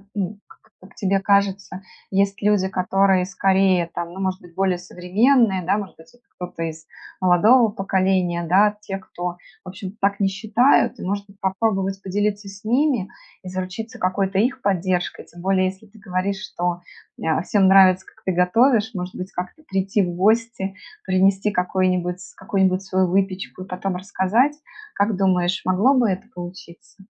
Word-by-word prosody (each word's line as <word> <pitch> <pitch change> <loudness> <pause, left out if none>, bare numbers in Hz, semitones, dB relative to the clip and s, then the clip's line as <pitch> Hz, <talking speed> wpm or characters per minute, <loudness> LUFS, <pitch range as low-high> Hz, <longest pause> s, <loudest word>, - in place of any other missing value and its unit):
ну, 200 +1 -3
как - - -18 0.2
как 190 +1 -17
тебе 195 0 +1
кажется, 200 -1 0 0.3
есть 200 0 0
люди, 205 -2 +2
которые 190 0 +2
скорее 190 -2 +2
там, 170 0 -5
ну, 190 - -7
может 190 -1 -1
быть, 170 -1 -17
более 190 -2 +1
современные, 190 +5 +2
да, 185 +4 +1
может 200 -4 -7
быть, 160 - -17 0.3
кто-то 180 -2 -6
из 160 0 -6 0.3
молодого 210 +7 +5
поколения, 190 -3 0
да? 205 +4 +4
Те, 200 -2 -5
кто, 180 -2 -6 0.3
в - - -12
общем, 185 +1 -7
так 200 +1 0
не 195 - +3
считают, 220 +7 +2
и, - - -8
может 200 +1 -2
быть, 200 0 -19
попробовать 195 0 -1
поделиться 205 +2 -2
с 195 0 -11
ними, 245 -3 +1 0.3
и 185 - -7
заручиться 185 +5 -6
какой-то 190 +1 0
их 255 +4 0
поддержкой? 185 -3 -1
Тем 175 - -14
более, 190 0 +2
если 190 +3 -5
ты 215 +1 -19
говоришь, 190 +1 -2
что, 175 -3 -3 0.4
э, 160 0 +1
всем 195 -1 +3
нравится 190 -1 +6
как 220 - -21
ты 190 - 0
готовишь, 220 +6 +3
может 180 -1 -5
быть, 185 +1 -7
как-то 180 - -6
прийти 195 +1 0
в 175 -2 -2
гости, 215 0 +1 0.3
принести 195 +2 +2
какой-нибудь 180 -1 0 0.2
какую-нибудь 190 -1 +1
свою 190 -1 +1
выпечку, 190 0 -1
и - - -13
потом 185 0 -3
рассказать? 200 +9 +1 0.4
Как 205 0 +1
думаешь, 185 -1 +1
могло 195 +9 +3
бы 245 -5 +3
это 185 0 -2
получиться? 175 +1 -11
190 Hz, 165 wpm, -22 LUFS, 185-200 Hz, 0.4 s, нравится